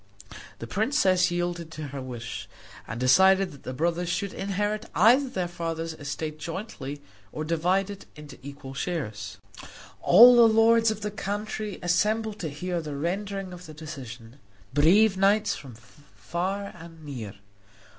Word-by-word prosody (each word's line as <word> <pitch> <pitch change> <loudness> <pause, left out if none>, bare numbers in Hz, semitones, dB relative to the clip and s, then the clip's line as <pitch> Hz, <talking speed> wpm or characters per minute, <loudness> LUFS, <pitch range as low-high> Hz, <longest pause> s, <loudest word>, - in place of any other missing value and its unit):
The 115 - -7
princess 185 - +2
yielded 175 -1 -2
to 155 -2 -6
her 140 0 -6
wish, 120 -3 -7 0.4
and 110 +2 -5
decided 190 +9 +5
that 140 - -14
the - - -6
brothers 170 +5 -1
should 185 +2 -2
either - - -7
inherit 205 +2 -2
their 240 -6 +4
father's 165 -1 -4
estate 155 +1 -5
jointly 160 -5 -6 0.3
or 155 - -4
divide 180 +5 +1
it 200 - -10
into 150 -1 -12
equal 140 -1 -9
shares. 110 - -4 0.6
All 240 +7 +9
the 235 -1 +8
lords 225 +1 +5
of 215 -1 -3
the 210 - -3
country 210 0 -4
assembled 210 +4 +1
to 160 - -3
hear 175 +4 -3
the 150 -2 -6
rendering 190 +4 -3
of 180 -1 -11
the 155 - -11
decision 130 -5 -9 0.3
brave 190 +8 +5
knights 200 +2 +3
from 130 -5 -11
far 150 - -6
and 165 -2 -13
near. 115 -9 -7
175 Hz, 145 wpm, -26 LUFS, 145-200 Hz, 0.6 s, All